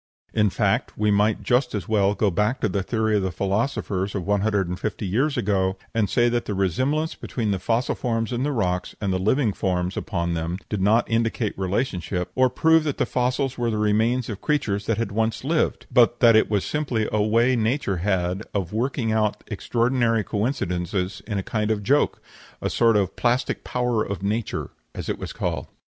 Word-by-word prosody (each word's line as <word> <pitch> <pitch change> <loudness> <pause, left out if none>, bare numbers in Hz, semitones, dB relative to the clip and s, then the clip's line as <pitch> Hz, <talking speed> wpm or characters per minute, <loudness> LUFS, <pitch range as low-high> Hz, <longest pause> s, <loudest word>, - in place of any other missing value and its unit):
In 105 -2 +3
fact, - - 0
we 105 0 +2
might 105 +1 +2
just 125 -1 +1
as 100 -5 -4
well 105 -2 +2
go 105 -2 +1
back 105 +8 0
to - - +2
the 100 0 -1
theory 110 +1 0
of - - +1
the 95 -1 -1
philosophers 100 - -1
of 95 -4 -3
one 100 0 +1
hundred 100 -3 +1
and 90 +1 -4
fifty 105 0 -3
years 130 +10 0
ago, 95 -4 +1 0.2
and 110 -3 +1
say 120 0 +3
that 120 0 0
the 105 - -3
resemblance 130 - 0
between 110 -4 -3
the 95 - -1
fossil 115 +7 0
forms 115 -1 -2
in 120 - -1
the 145 +2 0
rocks 90 -8 -1
and 100 -3 -1
the 95 - 0
living 110 +3 +2
forms 90 -1 -1
upon 85 -5 -2
them 85 +2 -2
did 105 -3 -2
not 110 +5 +3
indicate 115 -1 0
relationship, 95 -3 -2
or 130 0 +3
prove 160 +5 +4
that 145 -3 -2
the - - +1
fossils 125 +1 -1
were 120 -1 +1
the 110 - -1
remains 110 +4 +1
of 105 -3 -6
creatures 105 -10 -1
that 115 - +1
had 115 -3 -2
once 110 +2 -1
lived, 160 +4 0
but 120 -1 +4
that 115 -2 +6
it 110 - +4
was 100 -3 0
simply 130 -8 -1
a 105 - +1
way 115 +4 +3
nature 115 -3 0
had 90 0 0
of 95 -2 -2
working 120 0 -1
out 110 -1 0
extraordinary 115 +1 +1
coincidences 95 -5 -2
in 105 -3 -2
a 95 - -2
kind 105 +1 -1
of 105 -2 0
joke; 145 +8 +2 0.4
a - - -2
sort 115 -2 +4
of 100 -3 0
"plastic 120 +1 0
power 125 -3 0
in 100 - -4
nature," 110 +2 -2 0.2
as - - -5
it - - -2
was - - -5
called. - - -3
110 Hz, 205 wpm, -24 LUFS, 100-120 Hz, 0.4 s, that